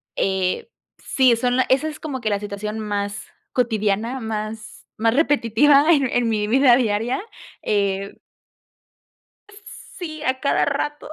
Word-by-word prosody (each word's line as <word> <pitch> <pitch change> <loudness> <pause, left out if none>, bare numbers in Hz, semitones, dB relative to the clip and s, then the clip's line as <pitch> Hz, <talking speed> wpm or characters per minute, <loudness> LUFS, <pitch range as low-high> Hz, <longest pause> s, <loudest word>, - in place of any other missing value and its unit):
eh, 190 - -1 0.3
sí, 255 -3 +2
son 245 +2 0
la 260 - +4
esa 275 +4 +2
es 300 - -9
como 275 -5 -5
que 215 - -1
la 200 -1 0
situación 210 +1 -5
más 205 -1 -4 0.3
cotidiana, 225 +1 0
más 220 0 -6
más 225 +1 +2
repetitiva 285 0 +3
en 250 -5 +2
mi 210 -1 0
vida 250 +1 +5
diaria, 230 - 0 0.4
eh 200 -1 -1 1.8
Sí, 310 -4 -6
a 260 0 -1
cada 280 - +2
rato, 295 +1 -3
230 Hz, 130 wpm, -21 LUFS, 210-270 Hz, 1.8 s, vida